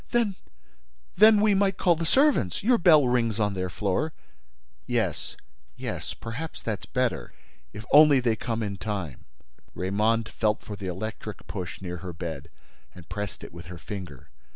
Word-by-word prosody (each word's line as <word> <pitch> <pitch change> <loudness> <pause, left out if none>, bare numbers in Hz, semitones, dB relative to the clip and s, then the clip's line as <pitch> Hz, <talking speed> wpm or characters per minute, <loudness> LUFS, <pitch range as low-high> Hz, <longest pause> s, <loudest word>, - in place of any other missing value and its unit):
"Then—then—we 200 - +1
might 195 -1 +2
call 175 -2 +3
the 165 0 -3
servants—Your 250 - +3
bell 155 -6 +6
rings 115 -3 +1
on 105 -1 +1
their 95 -1 -2
floor." 100 - -1 0.7
"Yes—yes—perhaps, 65 - -5
that's 105 -5 -4
better. - - -1 0.4
If 105 +1 -9
only 150 -2 +8
they 120 -3 +1
come 115 0 -3
in 100 -2 -3
time!" 95 - -5 0.5
Raymonde 110 +4 +1
felt 105 -1 0
for 105 - -6
the 100 -1 -6
electric 105 +3 -6
push 90 0 -6
near 90 -1 -4
her 90 +1 -7
bed 80 -4 -6 0.5
and 90 -3 -13
pressed 105 -2 -5
it - - -10
with 85 -1 -10
her 90 0 -8
finger. 85 - -8
105 Hz, 140 wpm, -26 LUFS, 90-145 Hz, 0.7 s, only